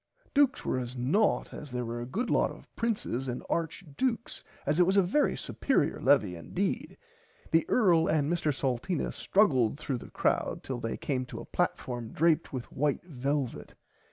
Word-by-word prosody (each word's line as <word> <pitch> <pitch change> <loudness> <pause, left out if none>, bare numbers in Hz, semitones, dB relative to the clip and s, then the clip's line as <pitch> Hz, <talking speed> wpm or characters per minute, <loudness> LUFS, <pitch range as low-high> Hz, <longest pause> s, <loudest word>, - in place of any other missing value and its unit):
Dukes 280 -2 +3
were 130 - 0
as 125 0 -5
nought 155 - +2
as 150 - -8
there 125 -1 -3
were 120 +1 -4
a 120 - -5
good 230 - -2
lot - - +3
of - - -12
princes 205 - -1
and 125 -1 -4
Arch 165 +3 -1
Dukes 235 -3 -1 0.2
as 150 +4 +1
it 180 - +7
was 190 +1 +3
a 195 - +6
very 285 +12 +2
superier 255 - 0
levie 130 -9 +4
indeed. 85 -3 -3 0.5
The 165 0 +3
earl 175 -9 +4
and 150 -2 +2
Mr 165 -2 +1
Salteena 135 +4 -1
struggled 135 - +3
through 135 -4 -3
the - - -11
crowd - - 0
till 130 -2 -4
they 115 -1 -3
came 130 -3 -2
to - - -7
a - - -8
platform 120 -3 -2
draped 165 +1 +2
with 125 -3 -6
white 145 0 0
velvit. 140 -4 -3
145 Hz, 180 wpm, -30 LUFS, 125-180 Hz, 0.5 s, it